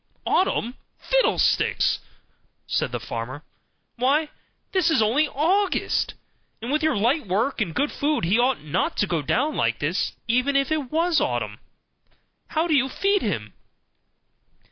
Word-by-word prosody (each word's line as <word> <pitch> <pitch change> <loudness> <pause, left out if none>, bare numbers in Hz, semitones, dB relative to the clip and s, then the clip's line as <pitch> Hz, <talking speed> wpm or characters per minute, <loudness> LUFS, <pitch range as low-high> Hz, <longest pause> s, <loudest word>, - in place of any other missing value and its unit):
"Autumn, 250 - +1 0.2
fiddlesticks!" - - +2 0.7
said - - -1
the - - -3
farmer. 125 +6 -6 0.5
"Why, 285 +5 +2 0.4
this 370 -3 +2
is 320 - +3
only 240 +8 +3
August; 365 +8 0 0.4
and 235 +4 -5
with 305 +2 +1
your 315 -6 +1
light 240 +5 +1
work 220 +8 0
and 170 -6 -2
good 290 - +1
food 295 - 0
he 195 +8 +2
ought 250 - +1
not 150 - -1
to - - +2
go 170 -5 -1
down 270 - 0
like - - +1
this, - - -1
even 250 +4 +1
if 275 +1 +2
it 295 -5 -1
was 330 +1 +2
autumn. 110 -3 -2 0.9
How 320 +1 0
do 335 - +1
you 265 -2 +3
feed 395 +7 +1
him?" 115 - -3
265 Hz, 145 wpm, -24 LUFS, 205-310 Hz, 0.9 s, is